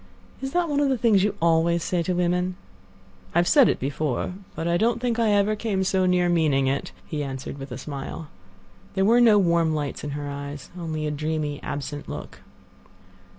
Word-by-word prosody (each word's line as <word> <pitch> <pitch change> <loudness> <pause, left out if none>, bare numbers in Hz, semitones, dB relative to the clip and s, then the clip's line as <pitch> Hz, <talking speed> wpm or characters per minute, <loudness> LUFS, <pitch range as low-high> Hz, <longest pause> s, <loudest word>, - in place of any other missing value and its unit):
"Is 270 0 -3
that 355 -1 +2
one 290 -2 0
of 285 -1 +2
the 265 - +1
things 215 -4 +4
you 205 0 0
always 170 +1 +2
say 180 -2 0
to 180 +1 -1
women?" 180 +1 0 0.8
"I - - +3
have 175 0 +4
said 280 -6 +6
it - - 0
before, 140 +3 -2 0.2
but 165 - -3
I 170 - +2
don't 230 +6 +2
think 235 -1 -1
I 225 -2 +3
ever 205 +1 +3
came 205 -3 -1
so 185 0 +2
near 180 -1 +3
meaning 155 -6 +2
it," 135 +1 -1
he 150 -2 -3
answered 135 0 -6
with 135 0 -8
a 125 - -5
smile. 140 +3 -6 0.7
There 190 0 +2
were 235 +3 +5
no 225 -3 +7
warm 170 -4 +2
lights 145 -2 -3
in 150 - -3
her 145 -1 -5
eyes; 140 0 -7
only 160 -3 -4
a 150 - -1
dreamy, 150 -1 -2
absent 145 0 -5
look. - - -7
170 Hz, 200 wpm, -25 LUFS, 145-205 Hz, 0.8 s, no